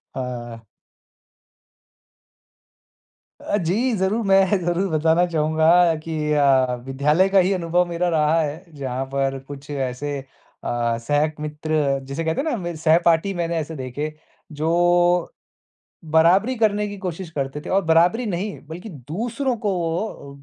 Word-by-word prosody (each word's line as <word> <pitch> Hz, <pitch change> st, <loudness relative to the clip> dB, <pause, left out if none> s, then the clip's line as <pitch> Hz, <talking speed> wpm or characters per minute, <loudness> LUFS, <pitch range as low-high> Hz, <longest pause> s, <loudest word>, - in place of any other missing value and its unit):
हाँ। 120 Hz, -3 st, -6 dB, 2.8 s
अ, 205 Hz, -, +1 dB
जी 215 Hz, +8 st, 0 dB
ज़रूर, 195 Hz, +5 st, 0 dB
मैं 195 Hz, 0 st, +4 dB
ज़रूर 175 Hz, +3 st, 0 dB
बताना 160 Hz, +2 st, +3 dB
चाहूँगा 160 Hz, -1 st, +1 dB, 0.4 s
कि 160 Hz, -1 st, -4 dB, 0.2 s
अ, 135 Hz, -3 st, +3 dB
विद्यालय 150 Hz, +8 st, +2 dB
का 195 Hz, 0 st, +5 dB
ही 185 Hz, +2 st, +2 dB
अनुभव 175 Hz, 0 st, +1 dB
मेरा 175 Hz, +1 st, -1 dB
रहा 160 Hz, 0 st, +2 dB
है, 155 Hz, +4 st, -4 dB
जहाँ 130 Hz, -1 st, -3 dB
पर 135 Hz, 0 st, 0 dB
कुछ 145 Hz, 0 st, -10 dB
ऐसे 140 Hz, +1 st, -3 dB, 0.5 s
अ, 115 Hz, -1 st, -1 dB
सहक 150 Hz, +4 st, 0 dB
मित्र 150 Hz, -2 st, -1 dB
जिसे 140 Hz, +4 st, -4 dB
कहते 160 Hz, +9 st, 0 dB
हैं 315 Hz, -, -2 dB
ना 245 Hz, -, 0 dB
मेरे 175 Hz, -3 st, -5 dB
सहपाठी 165 Hz, +3 st, +3 dB
मैंने 170 Hz, -1 st, -2 dB
ऐसे 160 Hz, +1 st, -4 dB
देखे, 145 Hz, +3 st, -5 dB, 0.4 s
जो 175 Hz, +3 st, +2 dB, 0.8 s
बराबरी 190 Hz, +10 st, +4 dB
करने 210 Hz, -2 st, +1 dB
की 205 Hz, -, -7 dB
कोशिश 180 Hz, -2 st, -5 dB
करते 140 Hz, -1 st, -4 dB
थे -, -, -7 dB
और 195 Hz, +1 st, +2 dB
बराबरी 175 Hz, +9 st, +3 dB
नहीं, 195 Hz, +2 st, -3 dB
बल्कि 175 Hz, +7 st, -8 dB, 0.2 s
दूसरों 240 Hz, +5 st, -2 dB
को 210 Hz, -2 st, -1 dB
वो 165 Hz, -5 st, -4 dB
165 Hz, 140 wpm, -22 LUFS, 145-185 Hz, 2.8 s, का